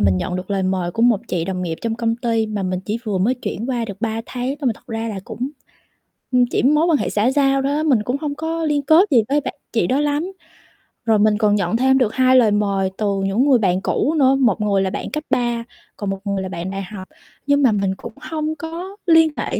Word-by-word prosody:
mình 95 -2 +3
nhận 180 - -2
được 185 +2 -7
lời 195 -1 0
mời 185 -2 -1
của 225 - -1
một 235 -4 +4
chị 170 -2 -1
đồng 185 0 -3
nghiệp 165 -2 -3
trong 230 -1 -1
công 230 -1 -1
ty 230 -2 0
mà 210 -2 -3
mình 185 -1 -2
chỉ 210 +4 -3
vừa 200 -3 -1
mới 225 +8 +2
chuyển 235 -2 -5
qua 240 -2 -1
được 200 -3 -8
3 225 0 -1
tháng 255 +2 -3
thôi 280 - -2
mà 240 - +3
thật - - -21
ra 225 0 -3
là 200 -3 -5
cũng, 255 +6 -5 0.8
ưm, 250 -1 +4
chỉ 245 - -1
mối 300 +4 +4
quan 320 -4 +4
hệ - - -2
xã 215 +5 +1
giao 275 -1 +2
đó 285 +3 0
mình 260 -9 +2
cũng 250 +5 -1
hông 290 -2 -3
có 325 +2 -3
liên 295 -2 +1
kết 320 +6 +5
gì 235 -4 +5
với 290 +1 +2
bạn - - -4 0.2
chị 225 -7 +1
đó 260 +8 +1
lắm. 295 +5 -1 0.7
Rồi 220 -2 +3
mình 210 0 +3
còn 210 -1 +3
nhận 200 +2 0
thêm 265 +1 +3
được 245 -5 +1
2 255 0 +4
lời 235 -5 +5
mời 200 -2 0
từ 200 -2 0
những 205 +7 +2
người 255 -3 +5
bạn 185 -3 +1
cũ 295 - 0
nữa, 270 -2 +4
một 235 -7 +2
người 200 -2 +2
là 190 - 0
bạn - - -5
cấp 305 +1 -3
3 240 -1 0 0.3
còn 205 - -3
một 195 0 -3
người 200 -1 -1
là 190 - -5
bạn 180 0 -5
đại 195 0 -4
học, 190 0 -9 0.4
nhưng 285 0 +3
mà 255 - +5
mình 195 -2 0
cũng 230 - -9
hông 310 0 -3
có 335 +5 -7
liên 325 -2 +5
hệ - - -2
230 Hz, 260 wpm, -20 LUFS, 195-275 Hz, 0.8 s, kết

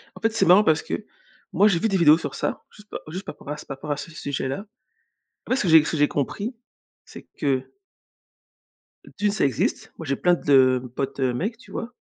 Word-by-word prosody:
En - - -13
fait, 225 0 +1
c'est 225 - +2
marrant 185 +4 +7
parce 160 -5 +3
que 210 - -5 0.5
moi, 205 - +5
j'ai 185 -5 +2
vu 225 - +1
des 195 - +1
vidéos 155 -2 +6
sur 145 -4 -6
ça, - - -3
juste 210 0 -18
pa - - -5
juste 185 +5 -6
par - - -7
ra 150 - -5
par 150 - -12
rapport 150 +2 -6
à 145 - -1
ce 165 - -8
sujet-là. 140 +3 -4 0.8
En - - -12
fait 255 - +3
ce 270 - 0
que 185 - 0
j'ai 160 -2 +7
ce - - -3
que 160 - -1
j'ai 145 0 +3
compris, 200 - -3 0.5
c'est - - -12 0.2
que 135 -3 -1 1.4
heu - - -15
d'1 205 0 +1
ça 205 - +1
existe. 140 - -1
Moi, 165 - -7
j'ai 140 -1 0
plein 180 0 +3
de 130 -4 +4 0.2
potes, 135 0 -3
heu, 125 -2 +1
mecs 210 - -3
tu 255 - -17
vois? 240 +2 -5
160 Hz, 235 wpm, -24 LUFS, 140-205 Hz, 1.4 s, marrant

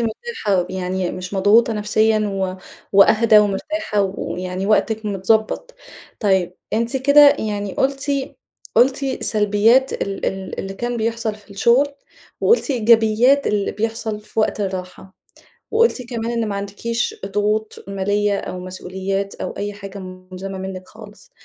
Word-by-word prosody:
مرتاحة 220 - -1
يعني 185 -1 -2
مش 185 +2 -6
مضغوطة 210 +4 +4
نفسيًا 215 +1 +2
و 190 -1 -2 0.4
وأهدى 215 +2 +6
ومرتاحة 210 +3 0
ويعني 185 -1 -4
وقتِك 220 +1 +1
متضبط. 215 - 0 0.5
طيب 190 -4 +1 0.2
أنتِ 230 +4 0
كده 285 +2 +6
يعني 205 -2 -3
قُلتِ 275 +1 0 0.6
قُلتِ 270 +1 +2
سلبيات 215 +5 +3
ال 195 0 -3
ال 190 -1 -4
اللي 195 0 -6
كان 240 +3 -3
بيحصل 225 -1 -2
في 210 -1 -19
الشغل، 235 +8 +3 0.5
وقُلتِ 460 -9 +3
إيجابيات 235 +2 +4
اللي 205 -1 0
بيحصل 220 0 -3
في 215 +1 -3
وقت 215 - 0
الراحة، 190 -1 -5 0.6
وقُلتِ 455 - +2
كمان، 230 -1 -3
إن 230 -2 -1
ما 205 - -3
عندكيش 205 +4 -3
ضغوط 210 +2 -1
مالية، 200 +1 0
أو 180 - -6
مسؤوليات 190 +2 -4
أو - - -5
أي 205 0 -3
حاجة 200 0 -9
مُلزَمَة 185 +1 -8
منِك 190 -1 -7
خالص. - - -14
210 Hz, 130 wpm, -20 LUFS, 195-230 Hz, 0.6 s, وأهدى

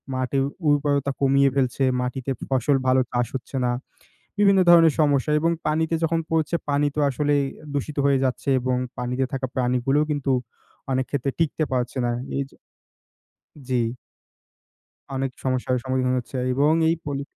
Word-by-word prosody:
মাটির 130 +1 0 0.2
উর্বরতা 145 -1 +2
কমিয়ে 140 0 +4
ফেলছে। 135 0 +1 0.2
মাটিতে 125 +1 -3 0.2
ফসল 135 +1 +2
ভালো 130 0 +4
চাষ 120 -1 0
হচ্ছে 130 +1 -5
না। 120 - +1 0.7
বিভিন্ন 200 -2 +5
ধরনের 165 -3 +7
সমস্যা 145 0 +2
এবং 165 +2 +2 0.2
পানিতে 160 +2 +1
যখন 165 0 +1
পড়ছে 160 +1 0
পানি 145 +1 +2
তো - - -1
আসলে 145 +2 0 0.4
দূষিত 145 +1 -3
হয়ে 135 -2 +3
যাচ্ছে 130 +1 -1
এবং 125 0 0 0.2
পানিতে 125 +2 -1
থাকা 135 -1 -2
প্রাণীগুলোও 130 +4 +1
কিন্তু 145 -2 -1 0.6
অনেক 130 0 +1
ক্ষেত্রে 135 -1 -1
টিকতে 160 -1 +1
পারছে 125 +1 -2
না। 120 - +1 0.3
এই 140 - 0
যে - - -21 1.1
জি। 125 -2 +1 1.3
অনেক 135 0 -1
সমস্যার 130 0 0
সম্মুখীন 130 0 0
হচ্ছে 125 +2 -6 0.2
এবং 145 +4 +3 0.2
এই 165 - +2
পলি 140 -1 -3
135 Hz, 150 wpm, -23 LUFS, 130-145 Hz, 1.3 s, ধরনের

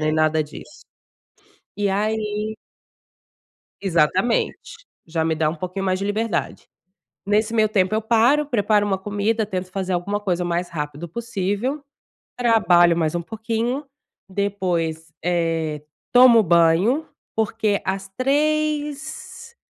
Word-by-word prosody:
nem 155 0 +1
nada 155 0 +2
disso. 150 - -12 1.0
E 205 -1 +1
aí 215 +1 -1 1.3
Exatamente, 190 - 0 0.2
já 160 0 -1
me 160 0 +1
dá 155 0 +1
um 160 - -2
pouquinho 185 +3 -4
mais 185 -1 +1
de 200 - -3
liberdade. 215 0 -2 0.6
Nesse 215 +3 +1
meu 215 -1 +3
tempo 200 -1 +1
eu 220 - +1
paro, 240 +7 +3
preparo 210 -5 +2
uma 195 - 0
comida, 205 +3 -1
tento 185 -2 -4
fazer 190 -1 -2
alguma 200 +4 -1
coisa 180 -4 -1
o - - -2
mais 175 +1 -1
rápido 150 0 -5
possível. 230 - -3 0.5
Trabalho 180 -8 +4
mais 160 0 0
um 175 - -1
pouquinho, 225 - -3 0.5
depois, 175 -5 -2
eh, 165 -3 -1 0.3
tomo 245 -3 +7
banho, 175 - +3 0.3
porque 220 -1 0
as 195 0 -2
15:00, 300 - -1
200 Hz, 125 wpm, -22 LUFS, 175-225 Hz, 1.3 s, tomo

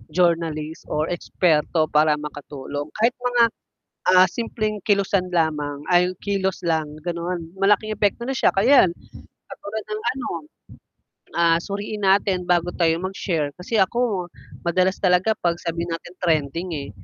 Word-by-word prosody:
journalist 165 -3 0
or 155 +1 -1
eksperto 160 -2 +1
para 150 0 +4
makatulong, 145 -1 -6
kahit 230 +3 +3
mga, 245 -1 +3 0.7
ah, 185 0 +7
simpleng 215 -1 -3
kilusan 200 -2 +2
lamang 150 -4 -1
ay 175 0 +5 0.2
kilos 195 -2 -1
lang 160 -3 0 0.2
ganon, 170 -1 -4
malaking 210 +2 +3
epekto 210 +2 0
nun. 270 - -2
'Tsaka 195 - +3
'yan 260 -6 +7 0.6
ekatulad 215 +2 -6
ng 215 0 -3
ano, 265 - -4 1.1
ah, 170 -1 +4
suriin 205 +2 -5
natin 190 -1 +2
bago 175 0 +3
tayo 165 -2 +3
mag-share, 175 -6 -2
kasi 215 +5 -2
ako 200 -2 +1 0.4
madalas 185 +2 +2
talaga 185 +3 +3
'pag 170 -1 +1
sabihin 170 0 -3
natin 175 +1 -7
trending 165 +1 0
eh, 140 -2 -5
180 Hz, 135 wpm, -22 LUFS, 160-200 Hz, 1.1 s, ah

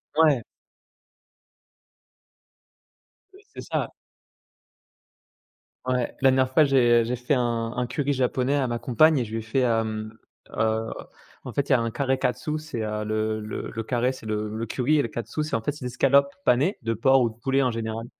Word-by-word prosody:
Ouais. 150 -6 +4 2.9
Ouais, 390 - -17
c'est - - -7
ça. - - -2 2.0
Ouais, 125 -1 -1
la 135 - +6
dernière 130 0 +2
fois 155 - +6
j'ai, 120 -4 +4
heu, - - 0
j'ai 125 - -1
fait 125 +3 -1
un 115 -3 0
un 125 -1 0
curry 145 +3 -1
japonais 130 +1 0
à 135 -3 +1
ma 120 -1 -2
compagne 135 +5 +4
et - - 0
je 110 - -11
lui 115 - -2
ai - - -5
fait, 115 +4 -1
hem, 110 -2 -1 0.3
heu, 110 +1 0 0.6
en - - -6
fait, 140 0 -1
il - - 0
y - - +7
a - - +3
un 115 0 -2
kare 135 +2 0
katsu, 130 +6 -1
c'est, 150 -7 -6
heu, 105 0 -3
le 110 0 -1
le 105 0 -6
le 115 - -4
kare 125 +2 0
c'est 130 -4 -12
le 105 0 -2
le 115 - -3
curry 130 +6 +1
et - - +4
le 115 - -2
katsu, 120 +7 -4
c'est 150 - -2
en 115 - -1
fait 130 - -1
des 125 - -7
escalopes 140 +3 +3
panées 140 - +2
de 115 -1 -1
porc 135 +4 +4
ou 120 - +2
de 110 - -13
poulet 135 +4 0
en 130 -2 +1
général, 115 0 -4
125 Hz, 200 wpm, -25 LUFS, 115-135 Hz, 2.9 s, y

